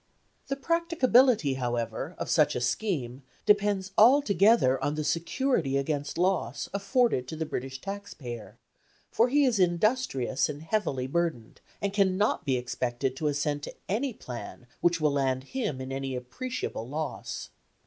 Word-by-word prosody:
The 275 - -1
practicability, 265 - +3
however, 120 +5 -2
of - - -4
such 150 -2 +3
a - - 0
scheme 135 - -2 0.2
depends 205 -2 +2
altogether 215 - +5
on 145 - 0
the 155 - -2
security 165 - 0
against 145 +1 -2
loss 175 -9 0
afforded 200 - +1
to 160 - -5
the 160 0 -2
British 135 -2 -5
tax 200 +1 -6
payer, 120 -6 -8 0.5
for 235 +2 +3
he 285 +2 +4
is 240 -6 +2
industrious 175 - +1
and 150 +1 -6
heavily 160 -8 -1
burdened, 150 -5 -2 0.2
and 200 -1 0
cannot 200 0 +2
be 130 -2 +2
expected 125 +1 -2
to 155 - -1
assent 145 0 -1
to - - -7
any 235 +8 0
plan 125 - -8
which 175 -1 +2
will 155 -1 +2
land 135 -2 0
him 210 - -3
in 130 0 -6
any 135 -1 -3
appreciable 125 - -5
loss. 150 +1 -4
160 Hz, 150 wpm, -28 LUFS, 130-210 Hz, 0.5 s, altogether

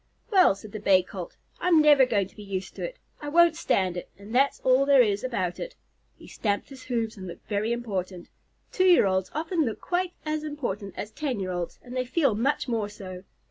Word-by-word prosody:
"Well," 370 - +6
said 200 +1 -12
the 215 - -6
Bay 190 -2 +4
Colt, 185 -1 -8 0.2
"I'm 350 -3 +4
never 295 -4 +6
going 200 -5 +1
to - - -24
be 210 - -11
used 195 -2 -5
to - - -6
it. - - -5 0.2
I 295 - -4
won't 340 +1 +5
stand 190 - 0
it, 175 - -6
and 200 +3 -11
that's 275 +3 +3
all 260 +1 +4
there 275 -2 +6
is 205 -2 0
about 185 -9 -2
it." - - -6 0.4
He - - -15
stamped 205 -2 -2
his 265 -2 -12
hoofs 230 -3 -2
and 185 -1 -7
looked 170 - -10
very 210 +2 -1
important. 195 -7 -4 0.4
Two 370 - +2
year 355 - +6
olds 190 -1 0
often 325 +2 0
look 225 -6 -3
quite 360 0 -1
as 305 0 -2
important 240 -10 -4
as 210 - -5
ten 275 -6 -3
year 185 -1 -3
olds, 175 -1 -4
and 250 0 -9
they 255 - +1
feel 275 -1 +2
much 255 +7 0
more 225 -4 -1
so. 185 -2 -9
230 Hz, 220 wpm, -26 LUFS, 195-290 Hz, 0.4 s, Well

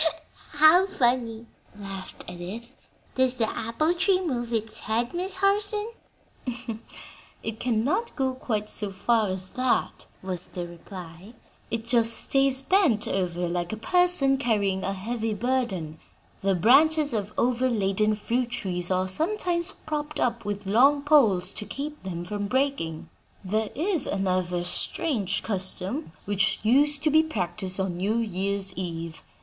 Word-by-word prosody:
'" - - -24
"How 310 +5 +6
funny!" 240 - 0 0.3
laughed 195 -2 -8
Edith. 185 +7 -7 0.4
"Does 260 -1 +2
the 230 -3 +1
apple 235 +11 0
tree 370 +1 +2
move 245 -10 -3
its 220 -1 -2
head, 235 +3 -1
Miss 365 +2 -2
Harson?" 410 +3 0 1.5
"It 220 -1 -4
cannot 250 - 0
go 265 -2 0
quite 215 -5 -3
so 210 -1 -3
far 215 +2 +1
as 185 0 -2
that," 255 -1 -1 0.2
was 185 -2 -3
the 175 -1 -6
reply; 175 +3 -11 0.3
"it 230 0 -3
just 230 -1 +4
stays 270 -1 +3
bent 285 - +3
over 180 -2 -1
like 175 0 -2
a 220 - -4
person 325 +1 +3
carrying 205 -7 0
a 195 - -1
heavy 220 +2 -3
burden. 205 -10 -1 0.4
The 195 -1 +2
branches 285 - +5
of 210 -2 -2
overladen 215 -4 +1
fruit 235 +4 -1
trees 180 -6 -3
are 185 0 +1
sometimes 340 - 0
propped 300 -1 -3
up 235 -1 0
with 205 0 -4
long 270 +8 +4
poles 215 -12 +4
to - - -3
keep 295 +6 -6
them 175 -2 -5
from 205 +2 -3
breaking. 260 - -1 0.4
There 215 +3 0
is 330 0 +1
another 185 -2 0
strange 200 - +1
custom, 195 - -3
which 200 -1 +2
used 285 +6 +3
to 310 - +3
be 315 +2 +6
practiced 195 - -3
on 190 -2 -1
New 205 +5 0
Year's 200 -2 -1
eve. 165 -3 -5
225 Hz, 140 wpm, -26 LUFS, 190-275 Hz, 1.5 s, How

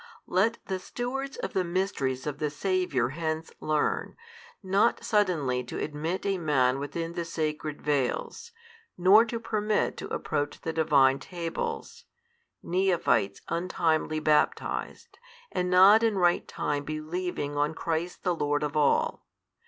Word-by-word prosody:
Let 220 +6 +2
the 190 -1 -3
stewards 265 +7 -4
of - - -4
the 190 - +1
Mysteries 170 -8 -1
of 145 -1 -4
the 150 - 0
Saviour 150 -6 0
hence 160 +2 -3
learn, 155 -1 -1 0.5
not 195 +5 +2
suddenly 160 - +1
to - - -6
admit 155 +5 -3
a 195 -2 0
man 135 -5 +2
within 165 +4 -4
the 170 - -2
sacred 155 -2 -3
veils, 150 - -1 0.5
nor 195 +6 +7
to 230 0 -4
permit 215 -2 0
to - - -6
approach 145 0 -2
the 165 - -4
Divine 140 -4 +4
Tables, 180 - -5 0.6
neophites 175 - +1
untimely 165 -2 0
baptized 155 - 0 0.3
and 180 0 -1
not 190 +4 +7
in 225 -3 +2
right 175 -1 +2
time 145 -1 -2
believing 155 0 -4
on 150 +2 0
Christ 165 +2 -3
the 180 - +2
Lord 145 -2 0
of 150 0 -3
all. 150 -1 +1
165 Hz, 135 wpm, -28 LUFS, 150-190 Hz, 0.6 s, nor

